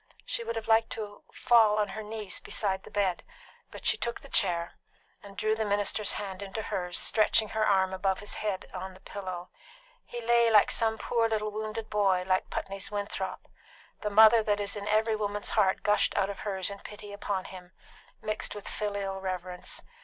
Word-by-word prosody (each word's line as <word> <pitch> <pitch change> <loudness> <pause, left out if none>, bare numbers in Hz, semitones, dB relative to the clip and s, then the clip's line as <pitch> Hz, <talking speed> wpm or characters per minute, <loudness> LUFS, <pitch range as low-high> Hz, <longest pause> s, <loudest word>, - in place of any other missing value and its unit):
She 235 - 0
would 230 0 -3
have 225 -1 -4
liked 225 0 +4
to 210 -2 -7
fall 220 -3 +4
on 210 -1 +1
her 215 +3 -5
knees 215 -2 -4
beside 190 -2 -1
the - - -11
bed; 195 -4 0 0.5
but - - -10
she - - +4
took 235 - -3
the 275 - -13
chair, 170 -6 +2 0.5
and 200 -1 -13
drew 215 0 +1
the 220 0 -1
minister's 205 0 +1
hand 195 -2 -5
into 200 +2 -5
hers, 180 -3 -3
stretching 215 0 +4
her 220 +1 0
arm 190 -2 +3
above 190 0 0
his 205 - -5
head 205 -3 -2
on 185 0 -6
the - - -15
pillow. 185 -3 -6 0.5
He 240 - -7
lay 235 0 +4
like 215 -2 +6
some 220 -1 +2
poor 230 0 +1
little 215 -1 -1
wounded 215 +1 -4
boy, 195 -3 +2
like 185 0 +1
Putney's 195 0 -4
Winthrop; 200 -2 -4 0.5
the 210 - -1
mother 220 +2 +7
that 210 -1 0
is 200 0 -1
in 205 0 -5
every 215 +1 +2
woman's 205 -1 -2
heart 195 -3 +2
gushed 210 0 +2
out 195 +1 +2
of 200 - -9
hers 195 -2 0
in 200 - -8
pity 205 0 -9
upon 200 -2 -3
him, 180 -1 -10 0.5
mixed 215 0 -2
with 205 - -7
filial 200 -2 -3
reverence. 185 -1 -4
205 Hz, 190 wpm, -29 LUFS, 190-215 Hz, 0.5 s, mother